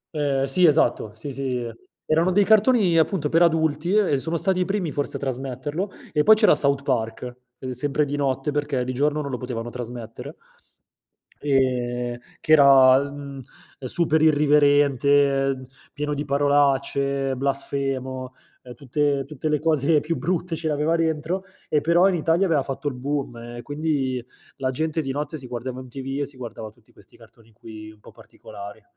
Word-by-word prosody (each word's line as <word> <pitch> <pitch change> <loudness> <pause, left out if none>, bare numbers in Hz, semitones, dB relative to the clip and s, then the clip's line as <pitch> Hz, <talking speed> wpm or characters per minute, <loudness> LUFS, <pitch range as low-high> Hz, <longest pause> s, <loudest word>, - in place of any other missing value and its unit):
Ehm, 140 -3 0
sì 170 +6 +3
esatto, 120 -8 +1
sì, 135 +6 -7
sì. 125 -3 -3 0.4
Erano 165 +4 +2
dei 205 +2 +4
cartoni 215 -4 +4
appunto 160 -3 0
per 165 +1 +3
adulti, 160 +1 +2
e 195 -10 +3
sono 165 +5 -1
stati 190 +2 0
i 180 - +1
primi 195 -5 -2
forse 145 0 -3
a - - -12
trasmetterlo, 135 +7 -4 0.2
e 150 - +2
poi 215 +8 +7
c'era 215 -5 +5
South 140 -1 +1
Park, 120 0 -2 0.2
uhm, 130 0 -6
sempre 145 +4 -1
di 145 - -3
notte 135 0 -1
perché 145 -3 -1
di 130 +1 -4
giorno 150 +3 0
non 140 -2 -5
lo 125 - -2
potevano 120 -2 -5
trasmettere. 120 -2 -8 1.1
Ehm, 125 -3 0 0.2
che - - -3
era, 135 -3 +7
mhmm, 140 -1 -8 0.4
super 155 +4 0
irriverente, 145 -2 +3 0.3
pieno 150 0 -3
di 145 +1 -3
parolacce, 140 -1 +1
blasfemo, 135 -1 -3 0.3
ehm, 125 -1 -10
tutte 140 +2 -1
tutte 150 +1 -4
le 150 -1 +1
cose 155 -1 +2
più 165 +3 -3
brutte 175 0 -2
ce 160 0 -4
le 150 - 0
aveva 150 +3 +1
dentro 165 +3 -1 0.3
e 150 - +2
però 170 +3 +4
in 190 - +1
Italia 165 +3 +2
aveva 160 -6 +2
fatto 135 +2 -5
il 140 - -1
boom, 135 -1 -3 0.2
e 120 - -6
quindi 145 -4 -2 0.3
la 130 -2 -1
gente 155 +4 -1
di 135 -3 -4
notte 150 +3 -4
si 130 -3 -8
guardava 125 +1 -5
MTV 135 +2 -5
e - - 0
si 140 -2 -10
guardava 115 -3 -7
tutti 105 - -26
questi - - -18
cartoni 115 0 -20
qui, 110 0 -11
un 105 - -20
po' - - -15
particolari, 100 +2 -12
140 Hz, 170 wpm, -23 LUFS, 130-155 Hz, 1.1 s, poi